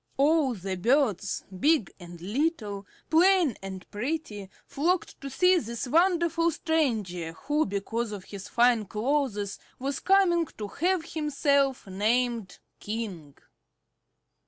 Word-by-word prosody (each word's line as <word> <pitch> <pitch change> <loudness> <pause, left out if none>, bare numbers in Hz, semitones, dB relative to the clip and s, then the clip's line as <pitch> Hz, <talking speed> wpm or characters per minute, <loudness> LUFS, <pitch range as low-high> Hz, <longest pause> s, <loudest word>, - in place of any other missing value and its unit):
All 285 -2 +3
the 190 -1 -4
birds, 215 - +1 0.2
big 295 - +2
and 175 -1 -11
little, 210 - -2 0.2
plain 345 - +4
and 190 -1 -7
pretty, 210 -4 -4 0.2
flocked 345 +5 -1
to 275 - -5
see 360 +7 +4
this 235 +1 -5
wonderful 335 +2 +3
stranger 220 - -1
who 295 - -1
because 215 +3 -3
of 200 -3 -6
his 200 0 -9
fine 235 -2 +3
clothes 215 -2 -1 0.2
was 270 +1 -3
coming 360 -4 +3
to 210 -1 -5
have 355 - 0
himself 280 -3 +1
named 220 +2 0 0.2
King. 200 -10 -6
245 Hz, 115 wpm, -27 LUFS, 200-315 Hz, 0.2 s, plain